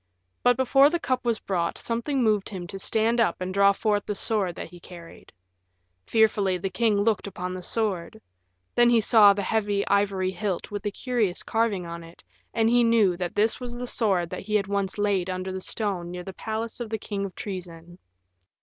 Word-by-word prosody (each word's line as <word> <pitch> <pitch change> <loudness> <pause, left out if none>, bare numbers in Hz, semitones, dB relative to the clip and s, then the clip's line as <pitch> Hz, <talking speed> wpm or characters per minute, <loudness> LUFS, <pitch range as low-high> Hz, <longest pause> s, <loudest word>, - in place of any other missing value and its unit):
But 245 -1 +4
before 270 +2 +5
the 345 +2 -1
cup 255 -4 -1
was 235 -2 +1
brought 175 -3 -2
something 245 +3 -1
moved 210 -3 +1
him 185 -3 -6
to 195 +2 -7
stand 225 +4 +1
up 230 - +2
and 185 0 -4
draw 200 0 +5
forth 205 0 0
the 210 - -2
sword 195 -4 0
that - - -7
he 175 - -12
carried. 170 -1 -13 0.8
Fearfully 205 -4 +2
the 190 +2 -4
king 225 -3 +2
looked 205 0 +1
upon 185 -2 -5
the 185 - -6
sword. 195 -3 -2 0.5
Then 240 0 +5
he 235 -1 +5
saw 215 -2 +6
the 200 0 -3
heavy 205 -1 0
ivory 195 -2 +1
hilt 190 -1 -3
with 205 -1 -4
the 205 - -2
curious 225 -5 -1
carving 220 -5 0
on 170 0 -7
it, 165 +1 -15 0.3
and 225 -1 +1
he 240 +1 +4
knew 225 -6 +4
that 180 -1 -4
this 215 +2 +2
was 245 -1 -6
the 245 +1 -5
sword 195 -8 0
that - - -5
he 215 +2 -3
had 200 -2 +2
once 200 0 -2
laid 200 -3 0
under 185 +1 -3
the 190 0 -5
stone 190 -5 -2
near 180 0 -6
the 190 - -8
palace 220 +3 -4
of 235 -2 -5
the 220 - -2
King 205 -1 -4
of 195 -2 -6
Troezen. 175 -3 -8
205 Hz, 205 wpm, -26 LUFS, 185-225 Hz, 0.8 s, saw